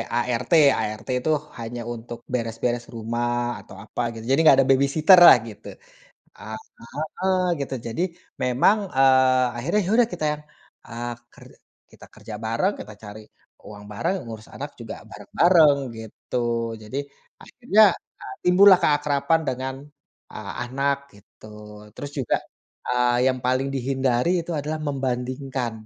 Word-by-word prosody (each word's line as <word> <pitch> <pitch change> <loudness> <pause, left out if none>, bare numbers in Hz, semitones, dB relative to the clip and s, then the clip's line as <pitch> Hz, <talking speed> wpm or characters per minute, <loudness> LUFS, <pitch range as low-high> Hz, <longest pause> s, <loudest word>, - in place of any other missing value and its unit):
ART, 120 +3 -1 0.3
ART 110 +3 -5 0.2
tuh 155 -1 +3 0.2
hanya 120 +1 -6
untuk 120 0 -9
beres-beres 120 0 -2
rumah 120 +1 -2
atau - - -15
apa 110 - -5
gitu 115 - -9
jadi 135 - +3
gak 135 - +8
ada 135 - 0
babysitter-lah 155 +7 +7
gitu. 105 - -13 1.3
Heeh, 185 +4 -1 0.2
gitu 135 -1 -3
jadi 115 +10 -3 0.4
memang, 125 - +3 0.2
eee, 130 -1 +5
akhirnya 170 - 0
ya - - -2
udah 240 -2 +4
kita - - -4
yang, 150 - -15 0.5
eee, 120 +1 -5 0.2
ker - - -16 0.5
kita - - -15
kerja 110 - -10
bareng, 115 - 0
kita 105 - -9
cari 105 +1 -9 0.4
uang 105 -1 -11
bareng, 105 - -1
ngurus 110 -1 -9
anak - - -6
juga - - -7 0.2
bareng-bareng 165 -5 +4 0.2
gitu 110 +2 -8 0.5
jadi 110 +6 -5 0.4
akhirnya 235 -4 0 0.6
timbullah 185 +2 +7
keakraban 145 0 +2
dengan, 130 +1 -3 0.6
eee, 105 -2 -7
anak 140 +3 0 0.2
gitu 100 +1 -18 0.5
terus 145 - -7
juga, 130 - +1 0.5
eee, 125 0 +2
yang 130 - -4
paling 130 +2 +1
dihindari 130 +1 0
itu 170 - -6
adalah 155 +2 -3
membandingkan, 130 -1 -3
130 Hz, 130 wpm, -23 LUFS, 120-145 Hz, 1.3 s, gak